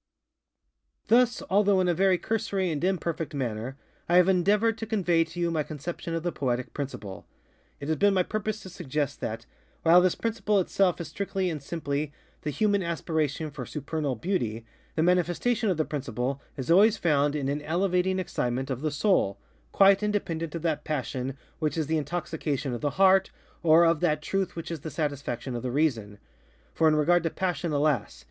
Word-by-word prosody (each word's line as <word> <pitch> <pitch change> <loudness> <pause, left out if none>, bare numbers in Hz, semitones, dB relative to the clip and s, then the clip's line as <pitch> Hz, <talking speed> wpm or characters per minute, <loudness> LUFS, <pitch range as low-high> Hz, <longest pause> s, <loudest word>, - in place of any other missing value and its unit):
Thus, 240 +1 +4
although 200 0 +3
in 185 - +2
a 175 - +3
very 185 +1 +3
cursory 195 -3 -1
and 150 +1 -3
imperfect 170 -4 -1
manner, 125 0 -3 0.3
I 175 - +3
have 180 0 +6
endeavored 205 +4 +3
to 225 - -4
convey 180 -6 +2
to 165 +2 -9
you 170 -1 +1
my 160 -2 0
conception 165 +3 -5
of 165 - -3
the 175 - -1
Poetic 125 -4 -2
Principle. 105 -9 -6 0.5
It 140 - -6
has 160 0 0
been 200 -1 +3
my 185 - +3
purpose 215 +2 -3
to 190 - -9
suggest 145 -4 -3
that, 115 +1 -4 0.4
while 170 +2 +7
this 185 -1 +2
principle 215 -2 0
itself 185 -1 +1
is 170 - -4
strictly 190 +1 -2
and 155 -3 -5
simply 145 -1 -3 0.3
the 155 - -3
Human 205 +4 +1
Aspiration 160 -3 -2
for - - -6
Supernal 150 -2 -3
Beauty, 115 - -2 0.3
the 160 - +2
manifestation 180 +6 +1
of 180 - +1
the 155 - +1
Principle 135 -1 -3 0.2
is 135 +4 -2
always 210 +5 +6
found 145 -5 +2
in 145 -2 -2
_an 140 +2 -1
elevating 180 +3 +1
excitement 130 -7 -2
of 130 0 -3
the 155 - 0
soul, 145 - +1 0.3
_quite 195 0 +5
independent 170 -6 -2
of 165 - -5
that 155 -3 0
passion 135 -3 -3 0.2
which 155 0 -1
is 160 - 0
the 160 +2 0
intoxication 150 -4 -3
of 120 - -4
the 145 +2 -2
Heart, 190 0 +5 0.3
or 165 +1 +6
of 165 -1 +3
that 155 -3 +1
truth 195 0 -1
which 165 0 -6
is 165 - -4
the 160 - -6
satisfaction 140 -4 -3
of 120 - -3
the 125 - -3
Reason. 120 -8 0 0.6
For 160 - +3
in 155 - +4
regard 170 +4 +3
to 165 - -1
passion, 180 -1 -2
alas! 140 - 0
165 Hz, 185 wpm, -27 LUFS, 145-185 Hz, 0.6 s, while